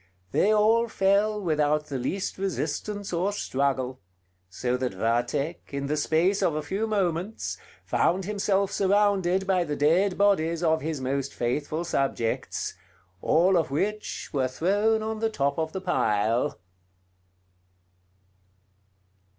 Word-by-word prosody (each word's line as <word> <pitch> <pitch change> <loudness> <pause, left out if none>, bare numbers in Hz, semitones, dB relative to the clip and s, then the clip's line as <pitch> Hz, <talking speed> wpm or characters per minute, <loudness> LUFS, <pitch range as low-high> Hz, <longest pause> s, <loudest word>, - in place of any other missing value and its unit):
They 210 - +3
all 220 +2 +4
fell 205 0 +2
without 150 -4 +1
the 140 -3 -4
least 185 +10 -3
resistance 200 +1 -3
or 180 +4 +1
struggle; 135 -8 -1 0.5
so 125 +6 -1
that 125 -5 -3
Vathek, 120 - -1
in 140 0 -3
the 145 +2 0
space 165 +6 +2
of 160 - +1
a 155 - -2
few 200 +8 -2
moments, 195 -1 -2 0.3
found 185 +2 +1
himself 200 -1 0
surrounded 195 -2 +2
by 185 -2 +2
the 150 -3 -3
dead 180 +7 +2
bodies 170 -5 +2
of 160 -1 +2
his 155 -1 -3
most 135 +1 -2
faithful 145 +7 -1
subjects, 135 -8 -1 0.5
all 180 +4 +3
of 165 -5 +2
which 210 +9 -3
were 135 -3 +1
thrown 205 +10 +1
on 220 0 -3
the 225 0 +1
top 140 -6 -1
of 160 0 -1
the 190 - -5
pile. 115 - +1
170 Hz, 130 wpm, -26 LUFS, 140-200 Hz, 0.5 s, all